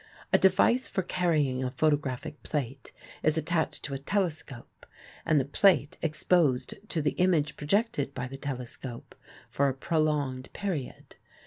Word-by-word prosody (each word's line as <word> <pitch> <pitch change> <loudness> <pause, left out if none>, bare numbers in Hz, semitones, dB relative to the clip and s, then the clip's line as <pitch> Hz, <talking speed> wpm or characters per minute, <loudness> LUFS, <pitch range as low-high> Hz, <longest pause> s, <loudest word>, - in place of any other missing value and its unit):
A - - +6
device 190 +7 +4
for 190 - -2
carrying 150 -8 +1
a 130 - -1
photographic 145 0 -1
plate 135 -3 -4 0.3
is 155 +1 +2
attached 160 +1 -1
to 140 - -4
a 135 - -3
telescope 155 - -3 0.4
and 155 -3 +4
the 130 - 0
plate 155 0 +3
exposed 150 -5 +2 0.2
to 160 - -1
the 150 - +2
image 170 -5 +2
projected 150 - 0
by 125 - -3
the 130 +1 -7
telescope 125 -3 -6 0.3
for 140 0 +1
a 130 - -3
prolonged 145 -4 -1
period. 180 -10 -5
150 Hz, 140 wpm, -29 LUFS, 135-170 Hz, 0.4 s, A